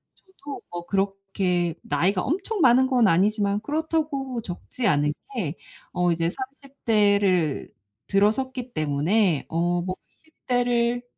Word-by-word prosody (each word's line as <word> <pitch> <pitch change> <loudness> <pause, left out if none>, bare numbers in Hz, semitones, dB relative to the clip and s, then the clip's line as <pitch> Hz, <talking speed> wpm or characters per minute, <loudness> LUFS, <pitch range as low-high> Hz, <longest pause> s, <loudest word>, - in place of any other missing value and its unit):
저도 295 -7 -10
뭐 175 0 -6
그렇게 195 -3 0
나이가 180 +6 +1
엄청 385 +6 -2
많은 260 0 +6
건 245 -5 +4
아니지만 200 +3 +2
그렇다고 295 -4 -2
적지 215 +5 -4
않은 150 0 +2 0.2
게 170 -8 -2 0.4
어 180 -1 +2
이제 165 0 0
30 275 +1 -10
대를 200 - +2 0.4
들어섰기 245 +5 +1
때문에 155 +4 +1
어 175 +1 0
뭐 185 +1 -3 0.2
20 315 -1 -30
대를, 245 -1 +1
205 Hz, 230 characters per minute, -25 LUFS, 175-260 Hz, 0.4 s, 많은